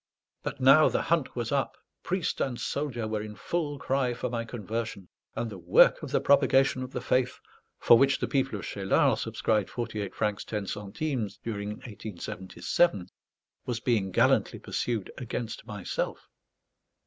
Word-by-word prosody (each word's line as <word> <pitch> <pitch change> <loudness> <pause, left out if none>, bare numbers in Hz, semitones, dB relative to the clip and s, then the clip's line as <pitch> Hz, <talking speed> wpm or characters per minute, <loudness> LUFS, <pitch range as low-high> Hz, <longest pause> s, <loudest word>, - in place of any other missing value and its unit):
But 140 - -5
now 135 +4 +7
the - - 0
hunt 165 -5 0
was 120 -2 -2
up; 140 -3 0 0.2
priest 185 -1 -1
and 125 -3 -1
soldier 130 -6 -2
were 110 -1 -2
in 105 0 -7
full 150 -1 -2
cry 130 -3 0
for 120 - -3
my 115 -1 -1
conversion; 110 -3 -4 0.3
and 115 - -2
the 95 - -8
Work 85 0 +5
of - - -6
the - - +2
Propagation 135 -2 +4
of 130 0 -5
the - - -4
Faith, 125 -1 +1 0.4
for 115 - +6
which 135 -1 +4
the - - -2
people 135 -5 0
of - - -7
Cheylard 95 -1 +2
subscribed 105 -3 0
forty 115 -3 -4
eight 100 -2 -5
francs 105 -1 -1
ten 105 -2 -3
centimes 105 +3 -3
during 105 -3 -3 0.2
1877, 95 - -1 0.6
was 120 -2 -1
being 115 -5 +1
gallantly 90 - +3
pursued 115 -6 -3
against 115 -2 -5
myself. 105 -5 -4
115 Hz, 160 wpm, -28 LUFS, 105-135 Hz, 0.6 s, now